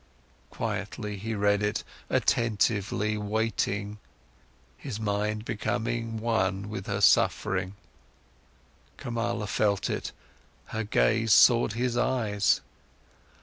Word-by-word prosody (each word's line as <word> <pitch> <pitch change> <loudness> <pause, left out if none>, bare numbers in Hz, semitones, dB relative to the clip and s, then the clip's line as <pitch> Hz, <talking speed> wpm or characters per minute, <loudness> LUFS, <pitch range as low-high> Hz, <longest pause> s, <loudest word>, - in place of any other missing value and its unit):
Quietly, 105 -1 -4
he 110 +3 -4
read 100 0 +2
it, 105 0 -1 0.3
attentively, 105 -1 +1
waiting, 105 -1 -1 0.8
his 125 -7 -6
mind 105 +1 -1
becoming 115 +1 -2
one 100 -3 0
with 95 -3 -6
her 100 0 -2
suffering. 95 -1 +3 1.2
Kamala 115 -2 -2
felt 100 0 0
it, - - -3 0.6
her 110 - -2
gaze 110 +1 +2
sought 120 -3 +6
his 120 +1 -1
eyes. 110 -5 +1
105 Hz, 95 wpm, -28 LUFS, 100-115 Hz, 1.2 s, sought